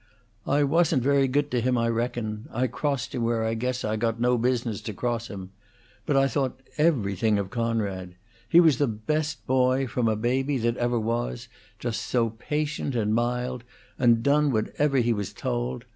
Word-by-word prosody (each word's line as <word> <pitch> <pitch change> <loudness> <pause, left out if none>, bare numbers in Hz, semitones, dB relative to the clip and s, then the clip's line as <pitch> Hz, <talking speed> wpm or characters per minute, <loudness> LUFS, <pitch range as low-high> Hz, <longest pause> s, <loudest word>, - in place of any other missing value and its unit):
"I 145 +1 +3
wasn't 155 -2 +2
very 140 0 +3
good 145 +2 0
to 125 - +1
him, 125 +1 +1
I 115 0 +1
reckon; 115 -2 -2
I 125 +3 0
crossed 135 +1 -2
him 125 - -2
where 115 -1 0
I 110 - 0
guess 125 +2 -2
I 110 0 -1
got 115 +1 -1
no 125 +1 +3
business 120 -3 0
to 110 -1 -6
cross 120 0 -2
him; 95 -2 -8 0.6
but 140 - +2
I 135 0 +4
thought 130 0 -1 0.2
everything 110 - +2
of 100 -2 -3
Coonrod. 100 -6 -2 0.3
He 170 - +7
was 160 -7 +5
the 145 - +3
best 150 +8 -2
boy, 130 +1 +2
from 120 -1 -1
a 110 - +2
baby, 130 +5 0
that 120 0 0
ever 120 -1 +1
was; 120 +1 -2 0.3
just 120 -2 -3
so 115 -3 0
patient 145 +3 -3
and 110 -2 +1
mild, 125 +1 -1 0.4
and 115 -2 +4
done 145 +1 +3
whatever 135 +5 0
he 120 -2 +3
was 100 -3 -4
told. - - -3
120 Hz, 185 wpm, -26 LUFS, 110-135 Hz, 0.6 s, He